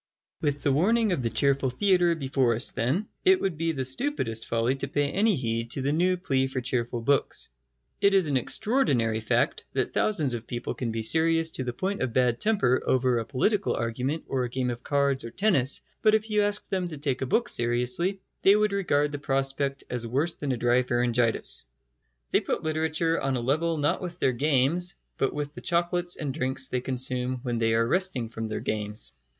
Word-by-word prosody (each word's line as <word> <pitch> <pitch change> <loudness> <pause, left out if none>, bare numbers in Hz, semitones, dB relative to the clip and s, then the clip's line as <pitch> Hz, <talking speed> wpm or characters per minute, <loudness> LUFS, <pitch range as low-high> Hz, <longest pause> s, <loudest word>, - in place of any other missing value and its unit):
With 145 -2 -1
the 140 - +2
warning 215 +9 +2
of 175 - 0
the 115 - 0
cheerful 140 +1 +2
theatre 175 +4 +2
before 135 -5 +1
us, 120 - 0
then, 145 - -1 0.2
it 375 0 +5
would 190 -4 -1
be 165 +2 0
the 135 -4 -2
stupidest 130 - -1
folly 115 +2 +1
to 135 - -3
pay 145 +1 0
any 210 +1 +2
heed 115 -3 -2
to 135 - -3
the 140 +2 +1
new 180 +3 +2
plea 135 -7 0
for 130 -1 -3
cheerful 120 -1 -1
books. 140 +4 0 0.5
It 200 0 +4
is 190 -3 +4
an 145 -3 -1
extraordinary 130 - +1
fact 110 - 0
that - - -1
thousands 155 -12 +1
of 115 -1 -5
people 120 0 -4
can 120 -3 -3
be 110 0 -3
serious 165 +6 +3
to 130 - -4
the 125 - -2
point 190 +10 -3
of 130 -3 -1
bad 125 -1 +2
temper 160 - +2
over 125 -2 +2
a 115 - -4
political 195 - +1
argument 125 +7 -2
or 130 -2 -1
a 125 - -3
game 125 0 -1
of 120 0 -6
cards 140 -1 0
or 115 - -6
tennis; 180 - +1 0.2
but 215 0 +5
if 220 0 -2
you 210 0 +3
asked 205 0 -1
them 185 -2 0
to 155 -3 -7
take 140 -2 -2
a 130 - -1
book 235 - +1
seriously, 125 +11 0 0.2
they 195 - +6
would 210 0 +2
regard 150 -7 +1
the 145 - -5
prospect 135 0 -1
as 120 -1 -4
worse 145 +8 0
than 145 -2 -3
a 125 - -1
dry 120 +2 +3
pharyngitis. 120 -2 0 0.7
They - - +4
put - - -2
literature 160 +1 0
on 135 -1 0
a - - -3
level 155 +6 0
not 145 0 0
with 175 -2 -6
their 130 - +1
games, 150 +6 +1 0.2
but 135 - +1
with 145 0 -4
the - - -9
chocolates 175 0 0
and 145 -4 -4
drinks 130 -2 -2
they 125 - -1
consume 125 -1 -2
when 120 -3 -2
they 115 0 +2
are 115 0 +2
resting 155 -8 0
from 115 -1 -5
their 110 - -4
games. 105 - -3
135 Hz, 210 wpm, -27 LUFS, 125-170 Hz, 0.7 s, they